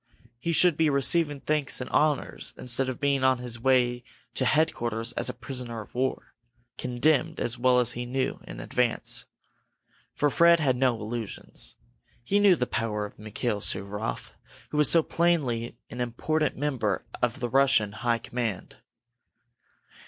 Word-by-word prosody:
He 165 +7 -2
should 170 -1 +4
be 160 -1 +3
receiving 145 +1 +1
thanks 150 -3 0
and 125 - -5
honors 150 -2 0
instead 125 +2 0
of 130 - -5
being 140 -2 +1
on 130 -1 +4
his 120 -1 -5
way 125 -1 +2 0.3
to 130 - 0
headquarters 120 -6 0
as - - 0
a - - 0
prisoner 125 -2 -5
of 105 - -14
war, 130 +1 -2 0.4
condemned, 125 +4 +1
as 120 - 0
he 120 - -8
well 125 -1 +4
knew, 125 +2 -2
in - - -8
advance. 120 - -1 0.9
For 145 -1 +1
Fred 170 +3 +5
had 135 -5 +2
no 125 -1 +2
illusions. 110 0 -6 0.5
He 200 +11 +2
knew 200 -3 +6
the 125 - -1
power 115 -4 -2
of 105 - -12
Mikail 110 +1 -3
Suvaroff, 100 +4 -2 0.4
who 150 - -2
was 150 -3 +5
so 165 -1 +6
plainly 135 -11 0
an 125 - -5
important 150 +6 -1
member 130 -8 -1 0.2
of 120 -1 0
the 120 - -2
high 135 - +2
Russian 110 -7 +3 0.3
command. 115 -6 -4
125 Hz, 150 wpm, -27 LUFS, 120-145 Hz, 0.9 s, knew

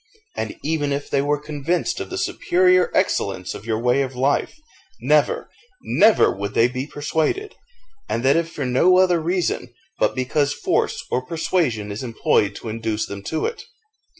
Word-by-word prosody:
And - - -4
even 150 -2 -1
if 140 +1 -3
they 140 - +2
were 145 +1 +1
convinced 155 - -2
of - - -5
the - - -5
superior 180 0 +2
excellence 90 - 0
of 110 - -10
your 110 -1 0
way 125 +4 +2
of 135 -1 -3
life, 135 - 0 0.4
never, - - +2 0.4
never 215 - +4
would 100 +1 -5
they 115 - +5
be 130 +2 -4
persuaded; 160 - -2 0.6
and 115 - -1
that 135 - +5
if 165 0 0
for 145 - -4
no 170 +9 +4
other 180 -2 +4
reason, 170 -6 -1 0.3
but - - +2
because 140 +3 0
force - - -1
or 125 - 0
persuasion 130 - -1
is 100 - -5
employed 110 -4 +1
to - - -8
induce 110 -1 -2
them 100 0 -7
to 160 - -2
it. 465 - -4
145 Hz, 170 wpm, -22 LUFS, 120-170 Hz, 0.6 s, they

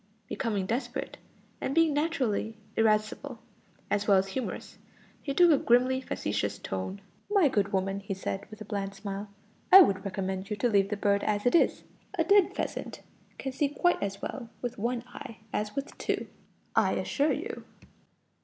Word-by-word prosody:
Becoming 210 -6 -1
desperate, 235 +7 -3 0.4
and 275 - -2
being 330 -2 +4
naturally 255 -8 0 0.2
irascible, 220 +4 +1 0.5
as 205 0 +1
well 200 -2 +6
as 190 +1 +1
humorous, 250 +5 -5 0.4
he 280 - -3
took 345 +4 +6
a 290 - +5
grimly 255 +2 +3
facetious 105 - -2
course. 95 - -4 0.3
"My 400 -6 +5
good 200 -6 +1
woman," 195 0 0
he 195 0 -4
said, 195 +1 -4
with 215 0 -11
a - - -6
bland 200 -2 -3
smile, 200 +1 -5 0.4
"I 385 - +12
would 195 - +3
recommend 190 -1 -3
you 210 - -1
to 225 +4 +1
leave 200 -2 +3
the 210 - -2
bird 200 0 +2
as 205 0 0
it 245 - +4
is. 340 - +3 0.3
A 330 - +3
dead 400 +2 +4
pheasant - - -4 0.3
can 270 - -4
see 280 +2 0
quite 350 +5 +1
as 200 0 -3
well 235 -4 -5
with 245 -3 -5
one 235 +2 -1
eye 250 -2 -10 0.2
as 210 +2 -2
with 275 +1 -4
two, - - -1 0.5
I - - +4
assure 290 +2 +1
you." - - -5
215 Hz, 175 wpm, -29 LUFS, 200-275 Hz, 0.5 s, I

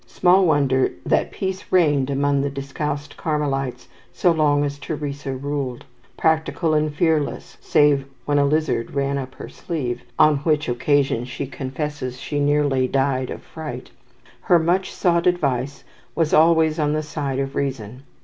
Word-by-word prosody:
'" - - -34
Small 185 +1 +5
wonder 140 -4 +2 0.2
that - - +1
peace 190 0 -4
reigned 145 -7 +3
among 140 0 +1
the 140 - -1
discalced 140 +1 -5
Carmelites 140 -4 -2 0.2
so 180 - +2
long 150 -3 +2
as 145 0 -3
Teresa 145 -1 -4
ruled. 140 -2 -4 0.3
Practical 160 +1 +1
and 155 0 +1
fearless 155 -1 -1
(save 145 -2 +3 0.2
when 145 0 +2
a 140 - +4
lizard 150 -4 0
ran 140 0 0
up 130 -1 -7
her - - -8
sleeve, 140 -8 -4 0.2
on 155 -1 +5
which 150 +1 0
occasion 135 0 +1
she 130 - -5
confesses 130 -1 -5
she 145 +2 -3
nearly 145 -3 +2
"died 135 -1 0
of - - -7
fright,") 150 -6 -8 0.5
her 175 - +4
much 175 +3 +1
sought 170 0 +1
advice 140 -6 0 0.3
was 165 -2 +1
always 160 0 +4
on 150 -1 +1
the 155 0 -1
side 145 -3 -3
of 135 0 -2
reason. 130 -3 -4
145 Hz, 155 wpm, -22 LUFS, 135-155 Hz, 0.5 s, Small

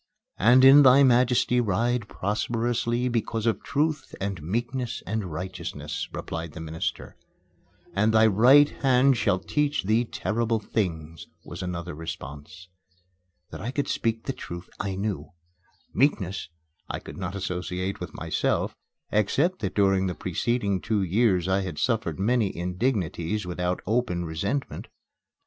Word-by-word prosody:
"And 125 +5 +6
in 140 +2 +9
thy 135 +1 +7
majesty 125 -1 +3
ride 115 +2 0
prosperously 120 +4 -1
because 115 -2 -1
of 115 - +1
truth 155 +1 -1
and 100 -3 -3
meekness 120 - -3
and 105 -5 -3
righteousness;" 90 +4 -5
replied 80 -2 -5
the - - -8
minister. 80 0 -4 0.8
"And 105 +3 +2
thy 110 0 +5
right 125 +8 +6
hand 135 -1 +3
shall 95 - +2
teach 150 +8 -1
thee 110 +5 +2
terrible 115 0 -1
things," 80 -7 -3 0.2
was 85 +3 -7
another 90 -2 -4
response. 80 +3 -8 0.8
That - - -7
I 115 - -3
could 140 +2 -2
speak 115 0 -1
the 135 - -3
truth, 85 -6 -8
I 100 -2 -2
knew. 100 -1 -4 0.6
"Meekness" 95 - 0 0.4
I - - -2
could - - -10
not 95 0 -4
associate 90 0 -3
with - - -7
myself, - - -1 0.4
except 140 - +1
that 95 -4 -3
during 95 -2 +3
the 90 - -3
preceding 100 +1 -1
two 110 -3 0
years 95 -1 +2
I 95 +1 +2
had 90 -5 -5
suffered 110 -10 0
many 110 0 +1
indignities 90 0 -1
without 90 0 -2
open 110 -5 0
resentment. 100 - -3
105 Hz, 135 wpm, -26 LUFS, 90-120 Hz, 0.8 s, in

